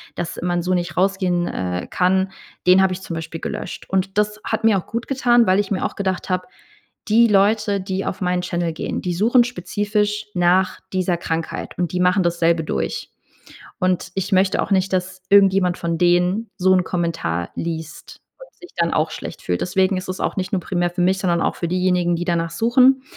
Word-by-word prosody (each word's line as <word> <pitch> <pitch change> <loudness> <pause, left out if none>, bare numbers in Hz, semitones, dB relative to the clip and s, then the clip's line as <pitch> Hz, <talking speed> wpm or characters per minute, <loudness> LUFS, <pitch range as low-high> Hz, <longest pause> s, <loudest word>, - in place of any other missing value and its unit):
dass 170 -1 -4
man 175 0 0
so 185 +1 0
nicht 175 -1 -2
rausgehen, 185 -2 +1
äh, 90 0 -3
kann, 190 +1 +1 0.4
den 185 +1 +7
habe 190 -1 +2
ich 185 - -7
zum 180 - -6
Beispiel 165 0 -6
gelöscht. - - -5
Und 190 +1 -1
das 210 0 +1
hat - - -2
mir 220 -3 +4
auch - - -11
gut 230 +1 -4
getan, 245 -3 +3
weil 185 +1 +4
ich 205 -2 -1
mir 190 - 0
auch - - -3
gedacht 190 -1 -2
habe, 185 0 -1 0.6
die 230 +2 +5
Leute, 205 0 +2
die 190 0 -3
auf - - -3
meinen 180 0 0
Channel 175 -2 -2
gehen, 160 - -4
die 180 - -2
suchen 230 +7 +4
spezifisch 210 -1 -2
nach 180 +1 +2
dieser 185 -2 0
Krankheit 165 -1 -4
und 175 -2 -1
die 180 - -1
machen 180 +1 +3
dasselbe 170 -1 +1
durch. - - -3 0.7
Und 185 0 0
ich 195 +1 -2
möchte 190 0 +3
auch - - -3
nicht, 190 0 +2
dass 185 0 -2
irgendjemand 195 -3 +4
von 170 -1 -2
denen 180 +5 +2
so 190 0 +4
'n 185 -1 +3
Kommentar 165 - -2
liest 165 -1 -6 0.2
und - - -14
sich 355 - -12
dann 170 -1 +1
auch 155 0 +1
schlecht - - -7
fühlt. 90 -1 -2
Deswegen 190 +1 +1
ist 185 - -5
es 185 - -4
auch - - -2
nicht 185 +2 -2
nur 190 - +1
primär 175 -1 -1
für 175 +1 -2
mich, 185 +2 +3
sondern 170 -3 +1
auch - - 0
für 170 - -3
diejenigen, 180 -1 +1
die 175 +1 -3
danach 170 -2 -1
suchen. 250 +7 +4
185 Hz, 205 wpm, -21 LUFS, 175-195 Hz, 0.7 s, den